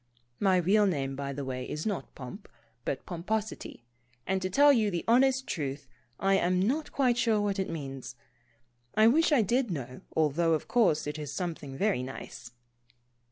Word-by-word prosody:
(My 190 -2 +3
real 200 +4 +4
name, 135 -6 -1
by 140 0 -4
the 140 0 -5
way, 130 -1 -4
is 150 - -4
not 200 -11 -3
Pomp, 135 - -9 0.4
but 135 - -3
Pomposity, 195 - -4 0.4
and 190 0 0
to 185 - -1
tell 285 +8 +6
you 220 -5 +2
the 175 -3 -2
honest 265 +3 +4
truth, 140 -3 -4 0.3
I 195 0 +3
am 180 +1 +1
not 270 +11 0
quite 250 -3 +2
sure 225 -3 +3
what 205 -1 -1
it 190 - -1
means. 135 -5 -6 0.8
I 215 - +5
wish 310 +9 +4
I 270 -7 +5
did 240 +4 +1
know, 130 -7 -5
although 160 +2 +2
of 155 - -1
course, 215 -11 +3
it 150 +1 -4
is 150 -3 -5
something 160 -7 -5
very 200 -8 +1
nice.) 125 -2 -8
180 Hz, 175 wpm, -29 LUFS, 140-220 Hz, 0.8 s, tell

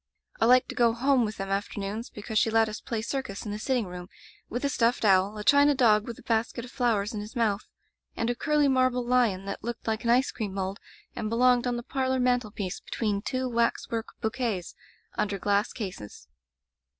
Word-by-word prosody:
I - - +4
liked 250 +1 +5
to - - -4
go 235 -2 +3
home 255 0 +2
with 215 0 -5
them 195 0 -4
afternoons, 205 +2 -3
because 215 +1 -2
she 225 - +2
let 225 0 +3
us 215 0 -6
play 225 -2 -3
circus 235 -6 -4
in 210 - -4
the 210 - -4
sitting 250 -1 0
room, 180 0 -8 0.4
with 245 +4 -3
a - - +2
stuffed 235 -3 +1
owl, 195 +1 +4
a 210 - -5
china 285 +3 +5
dog 215 -4 +4
with 235 - -6
a - - -14
basket 230 +1 -1
of 245 - -12
flowers 225 -5 0
in 210 - -3
his 210 +1 -9
mouth, 215 -4 0 0.5
and 230 - 0
a 240 - +1
curly 295 +3 +2
marble 255 -2 +2
lion 235 -6 +2
that 200 - -5
looked 235 0 -5
like 220 -1 -1
an 235 - -1
ice 255 +4 +3
cream 205 -4 -4
mold 195 +1 -3 0.4
and 215 - -3
belonged 245 +1 +3
on 245 -1 0
the 240 - -5
parlor 260 0 -1
mantel 250 -3 +1
piece 200 -2 -4
between 210 -3 -2
two 255 +3 -2
waxwork 230 -1 -1
bouquets 220 -5 -2 0.5
under 205 -1 0
glass 200 +2 +1
cases. 180 - -7
230 Hz, 210 wpm, -27 LUFS, 205-250 Hz, 0.5 s, liked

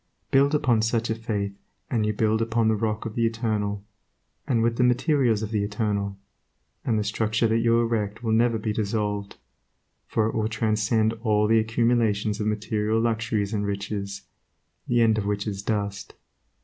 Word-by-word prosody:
Build 140 +2 +4
upon 125 -7 +2
such 115 +1 0
a - - +2
faith, 105 -3 -3 0.4
and 110 -3 +1
you - - +2
build 110 +1 +1
upon 115 0 +1
the 110 - +2
Rock 110 0 -2
of 115 - -4
the 115 0 +2
Eternal, 105 -3 -2 0.6
and 115 -4 +2
with 115 0 +1
the 125 - +3
materials 125 -3 +2
of 110 - -4
the 105 -2 0
Eternal, 100 -1 -2 0.7
and 115 - +1
the 105 - +1
structure 110 +2 0
that 110 +1 +2
you 115 0 +3
erect 115 -1 -1
will 115 - 0
never 115 +1 +3
be 110 0 -2
dissolved, 105 -1 -2 0.7
for 110 - +1
it 110 - -1
will 110 -1 0
transcend 110 0 +1
all 105 -2 +2
the 110 +1 +4
accumulations 110 -2 +1
of 105 - -1
material 110 +1 0
luxuries 115 -2 0
and 105 -1 -1
riches, 100 0 -4 0.6
the 120 -1 +3
end 110 -1 +4
of 100 - -3
which 105 0 -1
is 100 -2 -3
dust. 100 -1 -3
110 Hz, 175 wpm, -25 LUFS, 105-115 Hz, 0.7 s, Build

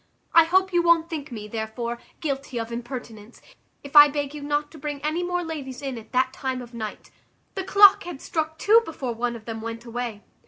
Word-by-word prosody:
I 330 -1 +8
hope 375 +2 +2
you 350 - +4
won't 340 0 +3
think 300 -3 -5
me, 215 -3 -6
therefore, 230 +2 -4 0.2
guilty 275 -4 -3
of 230 0 -5
impertinence, 235 -2 -7 0.4
if 280 +1 -11
I 295 0 +11
beg 290 -1 -3
you 300 - -7
not 290 +1 -1
to 315 - -12
bring 290 0 -4
any 310 +3 0
more 355 0 -1
ladies 285 -6 -6
in 270 -2 -3
at 220 - -16
that 260 +1 +1
time 260 -2 -3
of 240 0 -14
night. 220 -2 -7 0.4
The 385 - -3
clock 400 +1 +7
had 345 -5 -7
struck 315 +1 -3
two 445 +6 +5
before 275 - -4
one 240 +1 -2
of 220 -2 -11
them 225 -1 -5
went 230 +1 -6
away." 235 -3 -5
275 Hz, 210 wpm, -25 LUFS, 235-320 Hz, 0.4 s, I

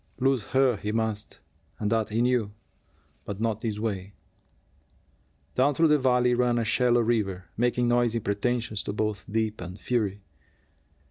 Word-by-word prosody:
Lose 135 -4 +2
her 130 -3 +2
he 105 +2 -3
must, 110 -1 -3 0.4
and 105 0 -2
that 110 -2 +1
he 115 +2 +1
knew; 120 -4 +1 0.7
but 100 -1 -6
not 110 -1 -1
this 110 -3 -2
way. 100 -3 -4 1.4
Down 135 +3 +2
through 165 +1 +4
the 150 0 +4
valley 125 -1 +3
ran 120 0 +2
a 115 - 0
shallow 120 +2 +3
river, 105 -6 0
making 120 +1 +1
noisy 120 -1 +2
pretensions 110 +1 -1
to - - -4
both 105 -1 -3
depth 110 -1 -1
and 90 +2 -7
fury. 105 -5 -1
115 Hz, 150 wpm, -27 LUFS, 105-125 Hz, 1.4 s, through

